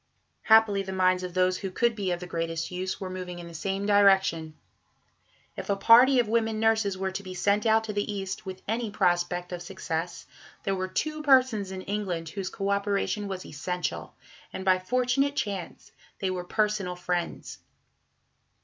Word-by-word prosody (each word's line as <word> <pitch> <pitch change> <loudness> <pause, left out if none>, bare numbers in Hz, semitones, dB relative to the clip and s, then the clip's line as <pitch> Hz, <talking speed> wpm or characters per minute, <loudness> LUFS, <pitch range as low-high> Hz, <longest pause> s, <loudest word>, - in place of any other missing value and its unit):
Happily 220 -3 +5
the 190 -1 -6
minds 185 -1 +2
of 180 -1 -6
those 185 0 +2
who 195 - -4
could 235 +5 +1
be 200 -3 -2
of 175 -1 -1
the 180 - -7
greatest 165 -1 -3
use 185 +1 -3
were 190 - -4
moving 185 -1 -6
in 175 -1 -8
the 170 - -11
same 195 +4 -3
direction. 190 -6 +3 1.0
If - - -7
a 200 - +3
party 240 +6 +7
of 240 -3 +3
women 220 -1 0
nurses 220 -3 +2
were 190 0 -2
to 190 - -4
be 185 -2 -8
sent 200 +4 +1
out 220 0 +4
to 215 -1 -5
the 205 +1 -1
East 195 0 -4
with 190 -2 -8
any 225 +1 -1
prospect 175 -2 0
of 175 -1 -5
success, 175 -2 -4 0.4
there 195 - 0
were 185 -1 -2
two 305 +11 -2
persons 255 -8 +3
in 190 0 -6
England 185 -5 -3
whose 190 +2 -4
co 200 0 -2
operation 200 +1 0
was 190 -1 -5
essential, 180 +5 -4 0.4
and 190 - -6
by 185 -1 +4
fortunate 255 +7 +1
chance 195 - -4 0.3
they 190 -1 -1
were 180 -1 -4
personal 210 -2 0
friends. 180 -1 -3
195 Hz, 180 wpm, -27 LUFS, 180-210 Hz, 1.0 s, party